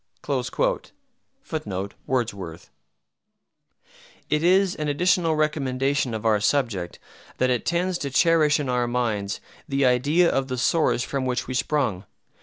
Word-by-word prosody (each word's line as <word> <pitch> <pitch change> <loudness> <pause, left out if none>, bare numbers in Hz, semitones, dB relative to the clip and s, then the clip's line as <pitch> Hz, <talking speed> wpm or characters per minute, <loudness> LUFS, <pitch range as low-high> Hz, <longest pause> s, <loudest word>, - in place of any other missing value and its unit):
[Footnote: 100 - -4
Wordsworth] 100 -10 -3 1.6
It 150 - +2
is 185 +1 +4
an 150 - -3
additional 165 +2 +2
recommendation 135 -4 0
of 110 - -6
our 110 -2 +3
subject, 105 -7 0 0.4
that 130 0 +2
it 125 - -1
tends 175 +1 0
to 140 - -3
cherish 155 +2 +3
in 145 - -2
our 125 -1 +1
minds 115 -5 -1 0.3
the 135 0 +2
idea 140 +8 +3
of 135 -4 0
the 130 -1 -3
source 125 0 +2
from 135 -1 -2
which 125 -1 -1
we 130 - -5
sprung. 125 -8 0
130 Hz, 130 wpm, -24 LUFS, 120-155 Hz, 1.6 s, is